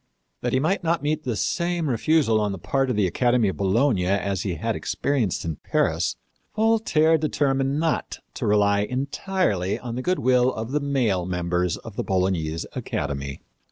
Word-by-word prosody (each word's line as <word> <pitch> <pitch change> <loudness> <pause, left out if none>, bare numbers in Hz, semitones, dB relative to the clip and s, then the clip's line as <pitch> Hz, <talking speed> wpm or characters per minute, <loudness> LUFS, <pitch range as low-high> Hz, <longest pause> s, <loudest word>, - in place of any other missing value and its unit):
That 120 - -1
he 130 - +3
might 175 +7 0
not 165 -1 0
meet 155 +1 -1
the 120 -3 -1
same 170 - -1
refusal 125 -3 +2
on 105 -1 0
the - - -5
part 130 +9 0
of 125 - 0
the 105 -2 +2
Academy 120 +3 +2
of - - -5
Bologna 100 0 +2
as 100 0 0
he 95 -3 -2
had - - -2
experienced 125 -13 -1
in 80 -3 -3
Paris, - - 0 0.4
Voltaire 215 -8 +3
determined 140 -2 0
not 160 -1 -1 0.2
to - - -3
rely 100 -1 +3
entirely 125 - -1
on 120 -2 -6
the 125 - -3
good 180 +7 0
will 125 0 +3
of 110 +3 -5
the 150 - +1
male 120 -11 0
members 90 0 -1
of 110 -3 -11
the - - -1
Bolognese 90 -4 -1
academy. 70 -1 -4
120 Hz, 175 wpm, -24 LUFS, 95-145 Hz, 0.4 s, he